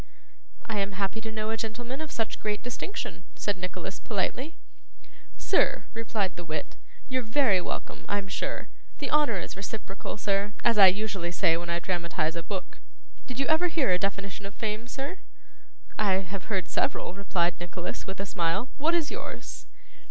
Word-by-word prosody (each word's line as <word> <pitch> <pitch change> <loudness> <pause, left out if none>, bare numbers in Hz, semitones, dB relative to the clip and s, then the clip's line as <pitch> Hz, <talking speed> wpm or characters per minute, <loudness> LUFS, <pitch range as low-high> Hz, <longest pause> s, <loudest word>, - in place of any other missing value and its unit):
'I 220 -3 0
am 200 0 +1
happy 195 +3 -1
to 220 0 -4
know 215 0 -1
a 225 - 0
gentleman 240 +5 -3
of 315 - -4
such 225 -1 -1
great 210 -1 -1
distinction,' 250 - -4
said 205 - 0
Nicholas, 185 +1 -4
politely. 255 - -1 0.8
'Sir,' - - +3
replied 220 -4 0
the 175 - -6
wit, 155 -2 -3 0.3
'you're 255 -1 +1
very 225 -5 +4
welcome, - - -4
I'm 200 -1 0
sure. 190 - -2 0.3
The - - -2
honour 295 -8 +5
is - - -5
reciprocal, 195 0 -5
sir, 200 0 +1
as 230 -3 +5
I 195 - +12
usually 190 -2 +1
say 165 -2 +4
when 170 +1 -3
I 170 - +2
dramatise 170 -3 0
a 170 - -1
book. 190 +2 -5 0.5
Did 250 -1 -4
you 275 - +3
ever 315 +4 +5
hear 315 - +3
a 180 - +4
definition 195 0 -2
of 200 - -10
fame, 220 +1 -2
sir?' 280 +8 -4 0.8
'I 205 -3 +4 0.2
have 195 - -4
heard 190 -5 0
several,' - - +1
replied 180 -3 +1
Nicholas, 175 0 -4
with 190 0 -4
a 195 - -1
smile. 175 +6 +1
'What 325 +4 +4
is 325 -4 +1
yours? 470 - -5
205 Hz, 175 wpm, -29 LUFS, 185-235 Hz, 0.8 s, I